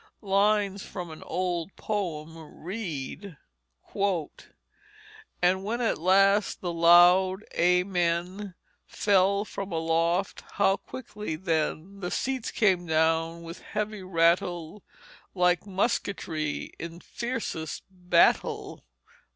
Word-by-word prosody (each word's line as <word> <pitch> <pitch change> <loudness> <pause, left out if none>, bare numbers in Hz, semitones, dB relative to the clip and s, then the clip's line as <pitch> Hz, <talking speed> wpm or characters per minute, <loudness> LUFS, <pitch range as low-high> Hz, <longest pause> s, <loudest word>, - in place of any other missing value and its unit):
Lines 200 0 +2
from 180 -4 -7
an 155 - -10
old 180 -1 -3
poem 165 -7 -3 0.3
read: 175 -2 -5 2.1
"And 185 +2 +3
when 225 +4 -2
at 230 -8 0
last 195 +4 +3
the 175 -2 -3
loud 175 +3 +6
Amen 180 +1 0 0.3
Fell 200 0 +2
from 195 -2 -6
aloft, 165 +3 0
how 195 -1 +3
quickly 210 -9 -7
then 165 +2 -2
The 180 -2 -3
seats 260 +1 -2
came 185 -5 +2
down 165 +1 +1
with 165 +1 -9
heavy 210 -1 -4
rattle, 175 +1 +1 0.5
Like 180 +1 +2
musketry 180 -6 -2
in 170 +1 -7
fiercest 230 -10 -4
battle." 180 -2 +1
180 Hz, 95 wpm, -27 LUFS, 170-200 Hz, 2.1 s, loud